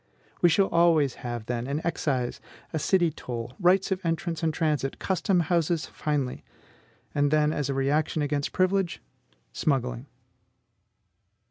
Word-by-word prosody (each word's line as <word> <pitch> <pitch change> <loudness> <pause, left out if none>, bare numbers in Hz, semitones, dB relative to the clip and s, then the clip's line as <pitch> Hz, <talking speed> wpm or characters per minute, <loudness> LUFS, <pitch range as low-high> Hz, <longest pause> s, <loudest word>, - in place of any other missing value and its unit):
We 175 - +6
shall 195 +4 +4
always 165 -6 +4
have, 120 -3 -4
then, 120 +1 -3
an 140 +2 -1
excise, 135 -7 -1 0.3
a 160 - 0
city 175 +1 +2
toll, 120 -4 -6
rights 190 +1 +3
of 190 0 -1
entrance 165 -1 -2
and 160 -1 +1
transit, 150 -4 -1
custom 185 -1 +1
houses 170 0 +1
finally; 145 -4 -2 0.7
and 145 0 +2
then, 150 0 +3
as 145 -2 -2
a 135 - -1
reaction 150 +3 +1
against 145 -1 -1
privilege, 185 -1 +1 0.5
smuggling. 120 - -1
155 Hz, 135 wpm, -27 LUFS, 135-170 Hz, 0.7 s, We